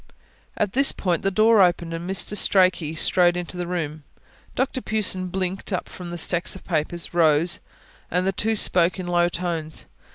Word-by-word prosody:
At 205 -2 -1
this 275 +2 +5
point, 175 -4 -2
the 195 - 0
door 215 +2 +4
opened 175 -2 +1
and 170 +2 -6
Mr. 195 +2 +2
Strachey 185 -6 +2
strode 175 +1 +2
into 175 0 -6
the 175 -1 -4
room. 160 -4 -4 0.5
Dr 260 0 -1
Pughson 190 -5 0
blinked 185 +2 -4
up 185 - -3
from 180 -1 -9
the 175 - -6
stacks 175 +2 0
of 190 - -12
papers, 170 +1 -1
rose, 165 0 +3 0.5
and 180 +2 0
the 195 - +1
two 220 +3 -1
spoke 180 -2 +2
in 185 - -5
low 175 0 +1
tones. 170 -3 -3
180 Hz, 175 wpm, -23 LUFS, 170-190 Hz, 0.5 s, this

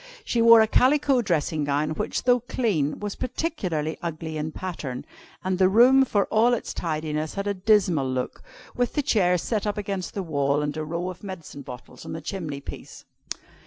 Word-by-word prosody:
She 235 - +1
wore 230 -1 +8
a 220 - +4
calico 270 +2 +3
dressing 160 -6 0
gown, 145 +2 0
which, 155 - -2
though 245 0 +4
clean, 205 - -1
was 205 -1 -4
particularly 185 - -3
ugly 160 -1 -5
in 155 +1 -3
pattern; 155 -8 -5 0.4
and 185 0 -1
the 185 -1 +5
room, 255 +6 +6
for 205 -5 +1
all 235 +3 +4
its - - -5
tidiness, 155 -2 -3
had 200 0 -3
a 205 - 0
dismal 185 -8 +2
look, 130 -1 -3 0.3
with 245 -1 0
the 295 - 0
chairs 180 - +2
set 215 -2 -1
up 210 - -2
against 195 -3 -4
the 195 - -2
wall, 140 -2 0
and 145 0 -2
a 155 - -3
row 170 +4 -3
of 180 - -14
medicine 185 -7 -8
bottles 125 -2 -11
on - - -7
the 160 - -4
chimney 155 -8 -5
piece. - - -10
185 Hz, 190 wpm, -25 LUFS, 155-220 Hz, 0.4 s, wore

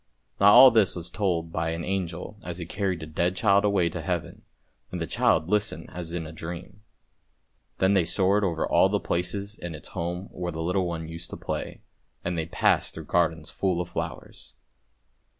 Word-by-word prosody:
Now 100 - +6
all 130 +1 +10
this 110 -4 +3
was 85 0 -6
told 90 -4 -1
by 80 0 -1
an 85 +1 -3
angel 95 +2 -3
as 85 -1 -6
he 85 - -5
carried 95 -1 -2
a - - -4
dead 85 +4 0
child 100 0 +4
away 100 -4 +3
to - - -5
Heaven, - - -3 0.5
and 90 - -4
the 85 - -1
child 80 +1 +2
listened 105 +2 -1
as 85 -2 -5
in 85 -1 -3
a 80 - -8
dream; 85 +5 -8 1.0
then 95 +1 +3
they 95 -4 +3
soared 100 +3 +2
over 85 -4 0
all - - +4
those - - 0
places 100 +4 -2
in 85 -2 -6
its 75 - -10
home 90 +2 -4
where 90 -1 -4
the 80 0 -4
little 90 +2 0
one 80 -1 -4
used 85 +1 -7
to - - -7
play, - - -5 0.4
and 85 0 -1
they 80 -1 -2
passed - - +1
through - - -7
gardens 80 -2 0
full 95 -3 0
of 90 0 -3
flowers. - - -6
90 Hz, 195 wpm, -26 LUFS, 85-95 Hz, 1.0 s, all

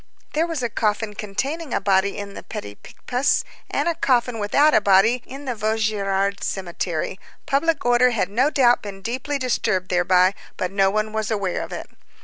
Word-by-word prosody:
There 320 +3 +1
was 325 -6 -3
a 240 - 0
coffin 210 0 -1
containing 265 +9 -3
a - - +2
body 195 0 +1
in 200 -1 -6
the - - -8
Petit 100 0 -7
Picpus, 250 - -1 0.3
and - - -1
a 340 - +2
coffin 245 -7 +1
without 285 +9 +3
a - - +5
body 205 +5 +4
in 275 +2 -9
the 255 - -1
Vaugirard 210 -3 0
cemetery, 180 -1 -3 0.3
public 310 -1 +1
order 245 +1 +5
had 225 -6 0
no 245 +8 +2
doubt 250 -5 +4
been 195 -2 -8
deeply 255 +5 -2
disturbed 220 -8 0
thereby, 180 +1 +3 0.2
but 185 0 -2
no 195 -1 +3
one 215 +2 -1
was 220 -1 -2
aware 200 -5 -1
of - - -7
it. - - -6
215 Hz, 180 wpm, -22 LUFS, 195-255 Hz, 0.3 s, a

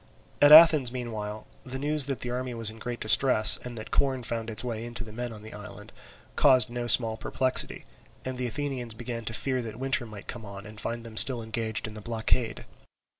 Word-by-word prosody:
At 145 0 +7
Athens, 155 -5 +8
meanwhile, 110 -4 -6 0.2
the 130 0 -6
news 145 0 0
that 135 -2 -3
the 120 - -3
army 125 0 -4
was 115 -2 0
in 110 - -14
great 120 +1 -6
distress, 110 +1 +4
and 120 -1 -8
that 110 - -8
corn 130 -3 0
found 115 0 -4
its 110 - -1
way 115 -2 -4
in 120 0 -9
to 120 - -2
the 110 - -11
men 120 +2 -5
in 105 -1 -11
the 110 - -11
island, 105 0 -11 0.4
caused 130 -5 +4
no 120 0 -4
small 115 -1 +4
perplexity; 130 +4 -1 0.4
and 130 -1 -5
the 125 - -2
Athenians 130 -3 -4
began 115 0 -6
to 110 - -4
fear 130 +1 -2
that 110 -2 -8
winter 130 -2 -1
might 105 -2 -11
come 115 -1 -7
on 100 -1 -10
and 105 0 -8
find 115 0 -4
them 115 -2 -11
still 120 -2 +5
engaged 110 0 -3
in 110 - -7
the 105 - -9
blockade. 115 +1 -2
120 Hz, 220 wpm, -27 LUFS, 110-130 Hz, 0.4 s, Athens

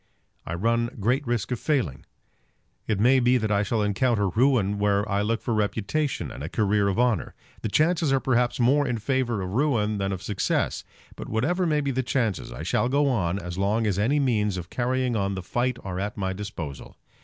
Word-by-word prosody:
I 85 - -3
run 115 +5 +1
great 125 +7 0
risk 120 -2 -1
of 125 - -1
failing. 125 - -1 0.8
It 105 -3 0
may 130 +5 +5
be 125 +1 +4
that 110 -3 -1
I 100 -1 +3
shall 105 +1 0
encounter 105 0 +1
ruin 110 -2 +2
where 100 0 +2
I 100 0 0
look 115 +2 -1
for 120 - -1
reputation 110 +7 -1
and 65 - -8
a 80 - -4
career 105 -1 +1
of 100 - 0
honour. 120 -6 +1 0.3
The 110 - -2
chances 155 - +2
are 135 - +3
perhaps 125 -2 +1
more 140 +4 +3
in 125 -2 -1
favour 120 -3 -1
of 90 - -5
ruin 110 -6 +1
than 95 0 -1
of 95 -2 -5
success. 105 -3 -1 0.3
But, - - -8
whatever 170 - 0
may 150 -2 +2
be 140 -1 -1
the 130 0 0
chances, 115 - -1
I - - -7
shall 120 - +1
go 140 +1 +2
on 95 -8 0
as 90 -1 -6
long 105 +4 +1
as 100 -2 0
any 135 +8 +2
means 105 -8 +1
of 90 0 -7
carrying 125 0 0
on 100 -2 0
the 95 - -5
fight 120 +5 -1
are 95 -1 -4
at 105 +2 -3
my 95 -1 -1
disposal. 95 -8 -7
110 Hz, 210 wpm, -25 LUFS, 100-130 Hz, 0.8 s, may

